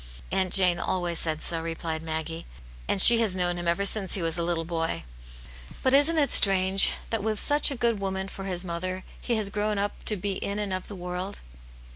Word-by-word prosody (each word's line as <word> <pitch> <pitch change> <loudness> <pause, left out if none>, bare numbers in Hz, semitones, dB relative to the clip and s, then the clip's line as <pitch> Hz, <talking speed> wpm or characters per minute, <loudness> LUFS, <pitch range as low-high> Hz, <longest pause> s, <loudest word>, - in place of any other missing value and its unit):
"Aunt 185 -1 -2
Jane 180 -3 +3
always 175 -1 -3
said 155 -1 -3
so," 165 -1 0
replied 165 -1 -6
Maggie, 160 0 -6 0.4
"and - - -2
she 235 +4 +11
has 215 -5 -1
known 175 -1 -2
him 175 - -6
ever 180 +4 -1
since 200 -1 -2
he 190 - -4
was 165 -1 -2
a 170 - -3
little 170 -1 -3
boy. 165 -1 -4 0.8
But 260 - +1
isn't 290 +4 +3
it 290 -2 +2
strange, 195 0 +5 0.2
that 225 -2 -2
with 215 0 -3
such 290 +1 +3
a 280 - -5
good 235 -3 -1
woman 190 -1 -5
for 195 0 -10
his 185 -1 -4
mother, 185 +2 -5 0.2
he 240 - -2
has 210 -2 -1
grown 210 0 -3
up 205 +1 -5
to 215 - +1
be 200 +2 -4
in 200 +1 -5
and 205 -2 -4
of 185 0 -6
the 205 - -10
world 180 +2 -7
190 Hz, 215 wpm, -25 LUFS, 170-205 Hz, 0.8 s, she